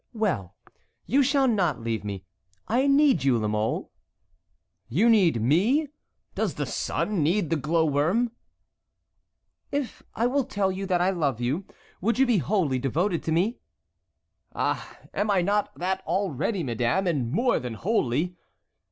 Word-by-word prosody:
"Well, 170 Hz, -, -1 dB, 0.5 s
you 275 Hz, +3 st, +3 dB
shall 275 Hz, 0 st, +3 dB
not 190 Hz, -, +1 dB
leave 115 Hz, -1 st, -2 dB
me. 100 Hz, -2 st, -6 dB, 0.4 s
I 255 Hz, +5 st, +2 dB
need 275 Hz, -, +4 dB
you, 135 Hz, -3 st, +3 dB
La 110 Hz, -1 st, -1 dB
Mole." 105 Hz, +1 st, -1 dB, 1.0 s
"You 200 Hz, -, +4 dB
need 180 Hz, -, +4 dB
me? 205 Hz, -, +2 dB, 0.4 s
Does -, -, -1 dB
the -, -, -2 dB
sun 205 Hz, -5 st, -1 dB
need 170 Hz, +3 st, +1 dB
the -, -, +3 dB
glow 160 Hz, +3 st, +1 dB
worm?" 165 Hz, -, +1 dB, 1.4 s
"If 280 Hz, -3 st, -3 dB
I 230 Hz, -, +1 dB
will 265 Hz, +1 st, +1 dB
tell 200 Hz, -7 st, 0 dB
you 195 Hz, +1 st, -4 dB
that 180 Hz, -2 st, +1 dB
I 185 Hz, +2 st, +3 dB
love 145 Hz, -, -1 dB
you, 140 Hz, +10 st, -1 dB, 0.4 s
would 230 Hz, +6 st, +1 dB
you 270 Hz, -, +5 dB
be 240 Hz, -6 st, +3 dB
wholly 160 Hz, -, 0 dB
devoted 165 Hz, -, 0 dB
to 160 Hz, -, -1 dB
me?" 185 Hz, +9 st, +1 dB, 1.0 s
"Ah! -, -, -2 dB, 0.2 s
am 210 Hz, +1 st, -1 dB
I 190 Hz, -3 st, +3 dB
not 205 Hz, +2 st, +1 dB
that 190 Hz, +2 st, -2 dB
already, 190 Hz, -, -1 dB
madame, 120 Hz, -, 0 dB
and 140 Hz, -9 st, 0 dB
more 240 Hz, -, +2 dB
than 125 Hz, -3 st, -5 dB
wholly?" 175 Hz, -, 0 dB
180 Hz, 150 wpm, -26 LUFS, 140-220 Hz, 1.4 s, you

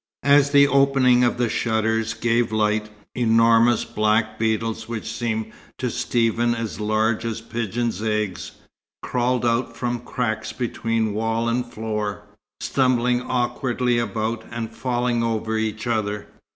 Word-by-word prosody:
As 140 Hz, 0 st, +5 dB
the 140 Hz, 0 st, +6 dB
opening 135 Hz, -3 st, +4 dB
of 120 Hz, 0 st, +2 dB
the 120 Hz, -1 st, +1 dB
shutters 110 Hz, 0 st, 0 dB
gave 115 Hz, 0 st, +1 dB
light, 105 Hz, 0 st, +1 dB, 0.2 s
enormous 115 Hz, 0 st, +4 dB
black 110 Hz, 0 st, 0 dB
beetles 110 Hz, 0 st, -1 dB
which 115 Hz, -2 st, -4 dB
seemed 110 Hz, -2 st, -3 dB, 0.3 s
to -, -, -2 dB
Stephen 120 Hz, 0 st, +1 dB
as 115 Hz, -2 st, -5 dB
large 110 Hz, +1 st, +1 dB
as 115 Hz, -1 st, -3 dB
pigeon's 115 Hz, -1 st, -3 dB
eggs, 105 Hz, -4 st, -2 dB, 0.5 s
crawled 125 Hz, 0 st, 0 dB
out 115 Hz, 0 st, 0 dB
from 120 Hz, -1 st, -2 dB
cracks 110 Hz, -2 st, -3 dB
between 115 Hz, -3 st, -1 dB
wall 115 Hz, +2 st, -1 dB
and 120 Hz, +1 st, -1 dB
floor, 105 Hz, -2 st, -3 dB, 0.4 s
stumbling 125 Hz, -2 st, +2 dB
awkwardly 125 Hz, -1 st, 0 dB
about, 115 Hz, -1 st, -2 dB
and 115 Hz, -2 st, -5 dB
falling 120 Hz, -1 st, 0 dB
over 110 Hz, -1 st, -1 dB
each 110 Hz, 0 st, -2 dB
other. 105 Hz, -3 st, -1 dB
115 Hz, 130 wpm, -23 LUFS, 110-120 Hz, 0.5 s, the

